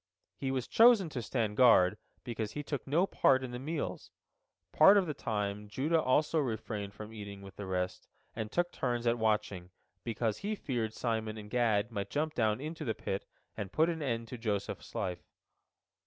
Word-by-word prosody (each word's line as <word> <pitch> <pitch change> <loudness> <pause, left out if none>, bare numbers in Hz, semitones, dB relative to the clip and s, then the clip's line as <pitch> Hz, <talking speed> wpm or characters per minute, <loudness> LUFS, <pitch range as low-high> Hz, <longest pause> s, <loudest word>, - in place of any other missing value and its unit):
He 135 - -3
was 130 -2 -1
chosen 225 -6 +6
to 130 -5 -4
stand 110 -2 -2
guard 95 -8 +6 0.3
because 110 -3 -4
he 145 - -4
took 145 -1 -4
no 160 +7 +3
part 130 -8 +3
in 130 - -5
the 125 - -5
meals. 150 +3 -4 0.6
Part 195 +6 +7
of 195 - +3
the 155 - -3
time 105 -4 -3
Judah 150 +10 +1
also 150 +5 +2
refrained 110 -6 -3
from 105 +1 -9
eating 100 -2 -8
with 95 -1 -11
the 100 - -6
rest, 90 0 -2 0.3
and 110 -1 -4
took 175 0 +1
turns 120 -2 -2
at 120 0 +2
watching, 105 -5 0 0.3
because 115 -2 -1
he 210 +2 -2
feared 120 - -3
Simon 110 -2 -2
and 105 -1 -9
Gad 115 -2 +2
might 100 -3 -3
jump 155 +1 -1
down 110 -3 +1
into 155 +3 -5
the 110 -6 -1
pit 95 - -4 0.3
and 100 -2 -5
put 160 +8 +3
an 165 -2 -3
end 115 -5 -2
to 125 - -7
Joseph's 105 -3 -3
life. 90 -1 -2
115 Hz, 185 wpm, -32 LUFS, 105-145 Hz, 0.6 s, Part